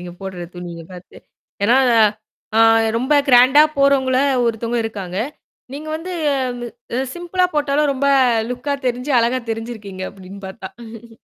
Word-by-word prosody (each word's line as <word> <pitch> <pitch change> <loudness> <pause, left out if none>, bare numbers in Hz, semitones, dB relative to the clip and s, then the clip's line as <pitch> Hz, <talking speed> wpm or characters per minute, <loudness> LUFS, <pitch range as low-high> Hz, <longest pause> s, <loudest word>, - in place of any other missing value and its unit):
நீங்க 175 0 -8
போடுற 190 -2 -6
துணிய 175 -1 -8
பார்த்து. 180 0 -13 0.5
ஏனா, 235 +5 +4 0.8
ஆ - - +5 0.4
ரொம்ப 260 +5 +1
கிராண்டா 260 +4 +7 0.2
போறவங்கள 270 -2 +3 0.3
ஒருத்தவங்க 230 +1 -1
இருக்காங்க. 195 -4 -5 0.5
நீங்க 300 +3 -7
வந்து 360 +3 -7 1.0
சிம்பிளா 350 +1 -1
போட்டாலும் 295 0 +1
ரொம்ப 275 +1 -1 0.4
லுக்கா 250 +4 -3
தெரிஞ்சு 250 +3 -2
அழகா 240 +2 0
தெரிஞ்சிருக்கீங்க 220 -4 -6
அப்டின்னு 195 0 -12
பார்த்தா. 225 +3 -11
235 Hz, 115 wpm, -19 LUFS, 195-275 Hz, 1.0 s, கிராண்டா